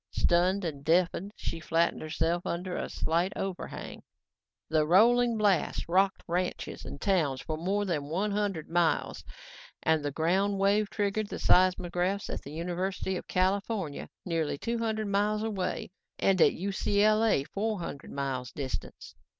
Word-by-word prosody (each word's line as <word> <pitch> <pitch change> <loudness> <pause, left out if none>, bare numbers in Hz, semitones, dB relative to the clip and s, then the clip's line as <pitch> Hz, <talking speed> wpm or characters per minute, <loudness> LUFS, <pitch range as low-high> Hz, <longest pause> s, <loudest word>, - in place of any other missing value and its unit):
Stunned 180 +3 +2
and 145 -4 -4
deafened, 180 +4 +2
she 165 - -4
flattened 165 +1 +1
herself 165 +2 -1
under 180 +1 -3
a - - -3
slight 170 +4 0
overhang. 190 -2 -5 0.7
The 155 -1 +2
rolling 235 +6 +5
blast 205 -4 +1
rocked 190 +3 +2
ranches 180 +1 -3
and 140 - -7
towns 155 -9 +1
for 155 - -4
more 195 +6 -1
than 160 -7 -1
one 195 +6 0
hundred 200 -6 -1
miles 170 -1 +1 0.6
and 160 -2 +2
the 145 - 0
ground 185 +7 +1
wave 200 +1 +2
triggered 205 +1 -1
the - - -4
seismographs 185 +1 +2
at - - -4
the 140 - -10
University 180 +4 -2
of - - -6
California 190 -3 -1 0.2
nearly 165 -5 -1
two 235 +9 -2
hundred 220 -1 -1
miles 210 +1 +1
away 195 -5 -3 0.3
and 190 -3 +2
at - - +6
UCLA, 205 -2 +2
four 215 +1 -1
hundred 155 -5 -7
miles 135 -3 -3
distant. 135 -3 -6
185 Hz, 145 wpm, -29 LUFS, 165-200 Hz, 0.7 s, at